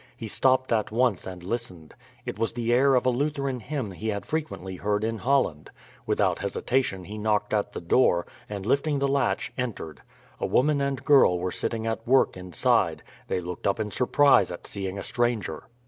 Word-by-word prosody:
He 115 -3 -6
stopped 130 +2 +2
at 110 -2 +1
once 115 -5 +1
and 90 -2 -8
listened. 90 -7 -5 0.3
It 125 -3 -5
was 115 - 0
the 120 0 0
air 135 +2 +4
of 125 - +2
a 130 - +4
Lutheran 140 0 -1
hymn 130 -4 -4
he 95 +5 -6
had 100 -2 -2
frequently 150 - -4
heard 105 +2 -1
in 115 0 -2
Holland. 125 - +1 0.4
Without - - +1
hesitation 120 -7 -1
he 105 +4 -7
knocked 105 0 0
at 105 -1 0
the - - -6
door, 85 -1 +3 0.2
and 100 -2 -5
lifting 140 +5 +1
the 140 0 +1
latch 140 0 0
entered. 105 - -4 0.4
A - - -1
woman 145 +2 +2
and 140 -2 -2
girl 135 - +6
were 90 +1 -2
sitting 115 +3 -3
at 115 0 -3
work 130 +2 +4
inside; 90 -3 +1 0.2
they 90 - -1
looked 90 +2 -5
up 100 - +1
in 105 -1 -2
surprise 130 -4 +4
at 85 - -8
seeing 95 -1 -4
a 100 - -5
stranger. 115 -10 -1
115 Hz, 190 wpm, -26 LUFS, 95-130 Hz, 0.4 s, girl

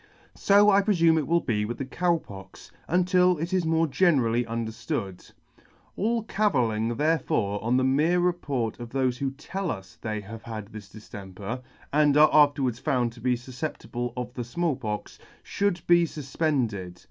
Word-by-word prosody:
So 205 +1 +5
I 200 0 +5
prefume 170 -6 +3
it 150 - -3
will 170 +1 +2
be 105 -3 -1
with 115 +3 -4
the 135 - -4
Cow 170 +5 +1
Pox, 100 -10 -12 0.2
until 180 0 +3
it 170 +4 -4
is 180 -3 +1
more 165 0 +2
generally 135 -7 +2
underftood. 115 -4 -4 0.6
All 230 +2 0
cavilling 120 - 0
therefore 145 -9 0
on 120 +3 +2
the 130 - +2
mere 150 +7 +2
report 145 -11 -1
of 120 -1 -7
thofe 130 -1 0
who 140 - 0
tell 180 +8 -5
us 95 -4 -7
they 110 -2 -3
have 110 +3 -9
had 110 -3 -7
this 105 -2 -10
diftemper, 105 +2 -8 0.3
and 150 -1 +4
are 155 +1 +7
after 145 -2 +5
wards 120 -2 -1
found 125 -3 0
to 120 - -14
be 125 +1 +2
fufceptible 120 -1 -5
of 125 0 -4
the 125 - -4
Small 155 +6 -1
Pox, 105 -5 -5 0.3
fhould 200 -4 -1
be 175 0 +5
fuf 150 -4 -9
pended. 110 - -1
130 Hz, 170 wpm, -26 LUFS, 115-165 Hz, 0.6 s, are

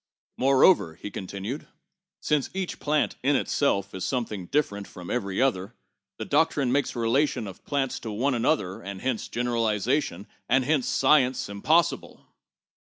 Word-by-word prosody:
Moreover," 130 - +4
he 105 - -8
continued, 100 +9 -6 0.5
"since 150 -3 0
each 190 -2 -3
plant 150 0 0
in 140 +2 +2
itself 100 -11 0
is 95 - -5
something 110 -8 -3
different 100 - -1
from 90 -1 -9
every 100 -6 -2
other, 100 -8 0 0.4
the - - -5
doctrine 145 -3 +2
makes 140 +1 0
relation 120 +2 +1
of 95 -2 -10
plants 135 -3 -1
to 115 - -6
one 125 +7 0
another, 115 - 0
and 100 -1 -7
hence 130 -4 -1
general 120 -1 -1
ization, 105 - 0 0.2
and 130 +1 +3
hence 145 -2 +1
science, 130 -7 +3
impossible." 155 +12 0
125 Hz, 145 wpm, -26 LUFS, 100-140 Hz, 0.5 s, Moreover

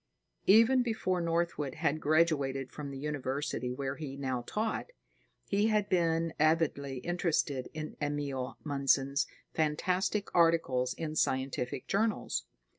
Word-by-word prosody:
Even 230 +5 +6
before 200 -7 0
Northwood 165 -5 -1
had 155 +2 0
graduated 145 -4 +2
from 145 -2 -6
the 135 - -6
university 140 -2 -2
where 135 +1 -3
he 140 -3 -6
now 130 -3 -2
taught, 220 +1 -2 0.6
he 205 +2 +2
had 210 -2 +1
been 165 -2 +1
avidly 150 -4 +2
interested 165 -7 0
in 155 0 -5
Emil 145 -3 -2
Mundson's 140 -1 +2 0.3
fantastic 180 +6 0
articles 165 -7 +3
in 155 -1 -4
scientific 130 -3 -1
journals. 205 - 0
150 Hz, 115 wpm, -31 LUFS, 135-170 Hz, 0.6 s, Even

